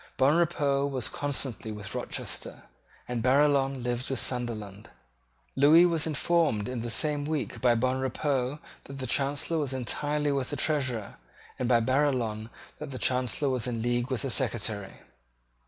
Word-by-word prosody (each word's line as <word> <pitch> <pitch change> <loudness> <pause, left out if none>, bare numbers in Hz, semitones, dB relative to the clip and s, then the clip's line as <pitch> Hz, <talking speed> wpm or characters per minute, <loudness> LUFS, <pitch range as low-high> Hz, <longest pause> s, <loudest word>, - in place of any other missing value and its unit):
Bonrepaux 145 -1 +2
was 130 -4 -2
constantly 135 -6 -2
with 105 -2 -8
Rochester; - - -4 0.4
and 125 -1 -2
Barillon 135 0 +3
lived 120 +1 -2
with 135 -3 -1
Sunderland. 110 -4 -2 0.7
Lewis 150 +6 +7
was 165 -2 +1
informed 155 -8 +1
in 125 -2 -3
the 120 - -4
same 145 +4 +1
week 145 -6 -3
by 120 -2 +4
Bonrepaux 130 +2 0 0.3
that 140 - -9
the 130 - -4
Chancellor 145 +5 0
was 140 -3 -2
entirely 145 +3 -1
with 135 -2 -1
the - - -3
Treasurer, 130 -9 -1 0.4
and 125 - -1
by 120 -2 +5
Barillon 120 -4 0 0.3
that - - -6
the 130 - -6
Chancellor 125 +3 +1
was 130 -2 0
in 115 -2 -2
league 120 +1 0
with 130 -1 -2
the 135 - -1
Secretary. 110 -6 -1
130 Hz, 150 wpm, -28 LUFS, 120-145 Hz, 0.7 s, Lewis